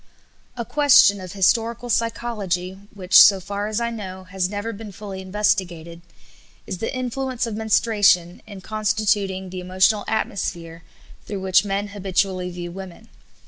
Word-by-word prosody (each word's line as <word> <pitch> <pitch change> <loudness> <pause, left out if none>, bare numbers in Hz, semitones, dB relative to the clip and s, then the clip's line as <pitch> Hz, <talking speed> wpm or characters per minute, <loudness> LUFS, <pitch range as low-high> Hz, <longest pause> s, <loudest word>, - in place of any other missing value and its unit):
A 235 - -3
question 285 -9 +5
of 185 0 -8
historical 230 +5 +1
psychology 220 -6 -2 0.2
which, 190 -1 +6
so 195 -2 +7
far 200 +2 -4
as 215 +1 -2
I 235 0 -2
know, 190 -4 -7
has 185 0 -2
never 205 +3 -4
been 215 0 -9
fully 195 -1 -8
investigated 185 -4 -2 0.6
is 185 - -6
the 225 - -3
influence 255 0 -3
of 225 -2 -5
menstruation 210 -5 +2
in 200 -3 -10
constituting 205 -2 -1
the 185 - -5
emotional 185 +3 +2
atmosphere 170 -6 -3 0.5
through 200 -2 -5
which 190 0 +3
men 200 +1 -2
habitually 190 -2 -1
view 175 -1 -7
women. 190 +4 -10
200 Hz, 145 wpm, -22 LUFS, 185-220 Hz, 0.6 s, so